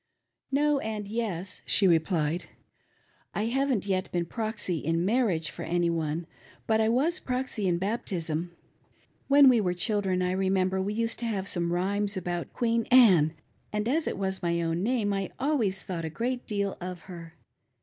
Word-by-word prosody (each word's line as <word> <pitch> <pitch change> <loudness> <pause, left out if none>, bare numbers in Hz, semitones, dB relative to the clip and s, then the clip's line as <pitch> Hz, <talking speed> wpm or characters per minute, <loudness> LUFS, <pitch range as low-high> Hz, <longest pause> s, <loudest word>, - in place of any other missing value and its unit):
" - - -58
No, 290 +1 +2
and 215 -4 -4
yes," 200 -4 -3
she 195 - +5
replied, 165 -1 +1 0.5
" - - -38
I 210 - 0
haven't 260 -3 0
yet 185 -2 -1
been 175 -1 -1
proxy 215 -4 -2
in 165 +3 0
marriage 195 -8 +1
for - - -9
any 170 0 0
one, 160 0 -2 0.4
but 220 0 +2
I 220 - +2
was 300 +10 +2
proxy 250 -5 -2
in 175 -1 +2
baptism. 175 -5 -2 0.8
When 280 0 +7
we 245 -4 +6
were 180 -2 0
children 190 -2 0
I 180 - 0
remember 190 0 +1
we 205 +2 -2
used 230 +1 -1
to 235 - -3
have 195 -4 -2
some 170 -2 -1
rhymes 200 +3 0
abbilt 175 -1 -3
Queen 230 -1 0
Anne, 185 -12 +6 0.4
and 210 +1 -1
as 305 +6 +1
it - - -2
was 190 -1 -2
my 170 -1 0
own 165 0 -1
name 215 -2 0
I 195 -2 -2
always 240 -9 0
thought'a 165 -3 -4
great 245 +8 -3
deal 200 -3 -2
of 180 -1 -6
her. 170 -3 -10
195 Hz, 175 wpm, -28 LUFS, 175-230 Hz, 0.8 s, When